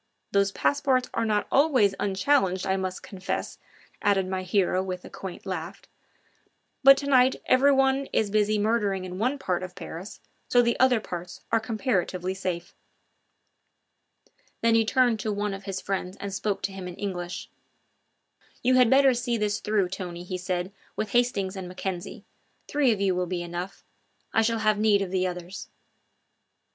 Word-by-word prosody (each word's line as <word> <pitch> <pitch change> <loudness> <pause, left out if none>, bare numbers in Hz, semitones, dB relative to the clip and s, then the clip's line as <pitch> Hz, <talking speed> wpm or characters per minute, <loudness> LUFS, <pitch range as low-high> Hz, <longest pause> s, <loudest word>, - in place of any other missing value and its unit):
Those 200 0 +2
passports 265 +1 +1
are 230 - 0
not 210 -1 +1
always 265 -9 +4
unchallenged, 195 -1 +1
I 190 - +1
must 185 -1 -4
confess," 190 -1 -4 0.4
added 195 -2 +2
my 185 0 -2
hero 185 0 +1
with 185 -1 -5
a - - -11
quaint 190 -2 -8
laugh; 175 -3 -5 1.0
"but 275 0 +9
to 280 - -4
night 260 -2 +4
everyone 270 0 +4
is 210 -2 +1
busy 215 0 +2
murdering 205 -3 0
in 180 0 -6
one 255 +6 +1
part 185 -10 -1
of 185 -1 -7
Paris, 180 +6 -8 0.3
so 245 0 +4
the 235 0 +2
other 255 -2 +5
parts 175 -4 -7
are 225 - +4
comparatively 200 -5 -1
safe." 180 -2 -4 1.9
Then 230 0 +3
he 225 0 +4
turned 245 -1 +3
to 215 +1 -2
one 205 0 -2
of 195 0 -8
his 195 -2 -3
friends 190 -1 -3
and 200 -1 -6
spoke 195 0 -2
to 195 - -1
him 190 -1 -6
in 180 - -7
English: 180 -3 -5 1.1
"You 255 +1 +4
had 250 -2 +5
better 270 0 +6
see 240 -1 -1
this 210 -1 0
through, 210 -4 0
Tony," 180 -2 -6
he 185 0 -5
said, 180 +1 -2 0.2
"with 215 -2 -3
Hastings 210 -6 +1
and 190 -2 -6
Mackenzie. 180 0 -5 0.4
Three 285 -4 +2
of 215 - -1
you 195 -2 +2
will 180 0 -1
be 175 -1 -3
enough; 175 +2 -6 0.5
I 225 - +4
shall 230 +1 +1
have 215 -1 +2
need 210 -2 +4
of 185 - -6
the 185 -1 +1
others." 180 +1 -7
200 Hz, 170 wpm, -26 LUFS, 185-230 Hz, 1.9 s, but